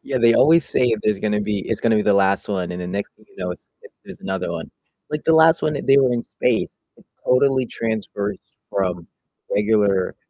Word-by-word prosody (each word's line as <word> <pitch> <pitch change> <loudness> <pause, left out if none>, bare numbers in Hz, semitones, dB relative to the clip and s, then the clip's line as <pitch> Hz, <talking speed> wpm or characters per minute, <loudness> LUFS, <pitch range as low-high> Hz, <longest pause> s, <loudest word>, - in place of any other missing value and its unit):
Yeah, 135 -2 -2
they 115 0 +4
always 165 +4 +5
say 125 - +1
if 110 -2 0
there's 105 -2 +1
gonna 105 -1 -1
be 105 -1 -2
it's - - -1
gonna 115 -1 +2
be 105 - +2
the 105 -1 +3
last 100 0 +2
one, 90 -3 -2
and 90 - -6
the 90 - -5
next 100 +3 -4
thing 110 - -24
you - - -25
know 90 -1 -4
it's 90 - -10 0.4
there's - - -11
another 95 -2 -3
one, 85 -1 -5 0.4
like 150 0 -4
the 160 - +4
last 160 +1 +5
one, 155 - 0
they 135 -1 +2
were 130 -2 +3
in 120 - -1
space, 120 -1 -1 0.3
it - - -22 0.2
totally 130 0 +2
transfers 110 -3 -4 0.3
from 90 -3 -2 0.5
regular 105 -2 +1
105 Hz, 215 wpm, -21 LUFS, 95-125 Hz, 0.5 s, always